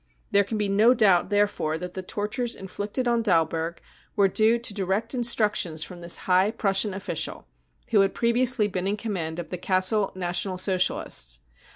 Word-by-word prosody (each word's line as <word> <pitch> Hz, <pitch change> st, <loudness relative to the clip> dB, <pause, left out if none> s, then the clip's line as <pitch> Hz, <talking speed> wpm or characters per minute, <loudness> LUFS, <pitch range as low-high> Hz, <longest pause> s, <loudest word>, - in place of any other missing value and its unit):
There 200 Hz, 0 st, +4 dB
can 215 Hz, +3 st, -4 dB
be 210 Hz, -1 st, -1 dB
no 215 Hz, +5 st, +4 dB
doubt 195 Hz, -6 st, +3 dB
therefore 205 Hz, -6 st, 0 dB
that 180 Hz, +1 st, -7 dB
the 190 Hz, -, -5 dB
tortures 215 Hz, +6 st, -3 dB
inflicted 205 Hz, +6 st, -4 dB
on 235 Hz, -1 st, +2 dB
Dalberg 165 Hz, -4 st, 0 dB, 0.4 s
were 200 Hz, -3 st, +4 dB
due 220 Hz, +4 st, +2 dB
to 235 Hz, -2 st, -2 dB
direct 200 Hz, +4 st, -2 dB
instructions 210 Hz, -9 st, 0 dB
from 175 Hz, +1 st, -10 dB
this 170 Hz, 0 st, +3 dB
high 185 Hz, +2 st, +3 dB
Prussian 200 Hz, -2 st, +1 dB
official, 195 Hz, -, -4 dB, 0.5 s
who 215 Hz, -, +4 dB
had 195 Hz, 0 st, 0 dB
previously 235 Hz, -1 st, +2 dB
been 185 Hz, -1 st, -3 dB
in 205 Hz, +1 st, -1 dB
command 180 Hz, -8 st, -4 dB
of 170 Hz, -3 st, -7 dB
the 180 Hz, -, -3 dB
Gassel 190 Hz, +3 st, +1 dB
National 185 Hz, +1 st, -1 dB
Socialists. 120 Hz, -, +1 dB
195 Hz, 170 wpm, -25 LUFS, 180-220 Hz, 0.5 s, There